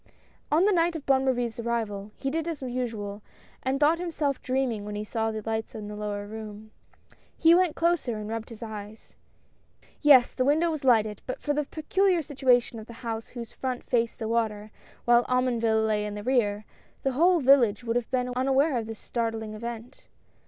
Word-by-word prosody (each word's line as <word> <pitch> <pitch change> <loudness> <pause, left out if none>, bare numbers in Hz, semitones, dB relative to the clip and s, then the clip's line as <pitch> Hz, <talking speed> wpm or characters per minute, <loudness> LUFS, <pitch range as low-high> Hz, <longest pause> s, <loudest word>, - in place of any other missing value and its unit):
On 325 +5 +4
the 420 - +4
night 340 -2 +2
of 310 - -6
Bonne 270 -1 +3
Marie's 245 -2 -1
arrival, 220 -4 -2
he 270 - -2
did 325 +2 -2
as 320 -5 -4
usual, 225 -5 -4 0.4
and 265 +1 -1
thought 310 +3 +4
himself 310 -6 -2
dreaming 255 -5 -1
when 210 0 -6
he 210 - -3
saw 225 +1 -1
the 220 -1 -4
light 220 0 -3
in 210 -1 -6
the 210 - -6
lower 205 -1 -4
room. 215 0 -9 0.7
He 330 0 +6
went 355 -3 +3
closer 330 -9 +1
and 210 0 -6
rubbed 225 0 -4
his 230 0 -9
eyes. 215 -1 -9 0.9
Yes, 275 -5 +6
the 255 - 0
window 315 +5 +3
was 310 -2 -4
lighted, 220 -5 +3
and - - -36
but 255 - -4
for 295 - -1
the 300 0 -1
pe 310 - -8
culiar 375 0 +2
situation 250 -5 +2
of 220 - -10
the 235 - -10
house 225 -1 -3
whose 235 -3 -8
front 255 -2 -4
faced 235 -2 0
the 220 - -4
water, 215 -2 -1 0.3
while 240 0 +5
Omonville 235 -3 +2
lay 210 -1 +1
in 205 - -5
the 205 - -6
rear, 215 -4 +1 0.4
the 270 - +1
whole 345 +7 +4
village 250 -6 +4
would 230 -1 -2
have 245 -1 -1
been 250 -1 -1
aware 270 +2 +2
of 225 - -5
tliis 225 - -5
startling 225 -1 -3
event. 235 +2 -8
240 Hz, 200 wpm, -27 LUFS, 220-275 Hz, 0.9 s, He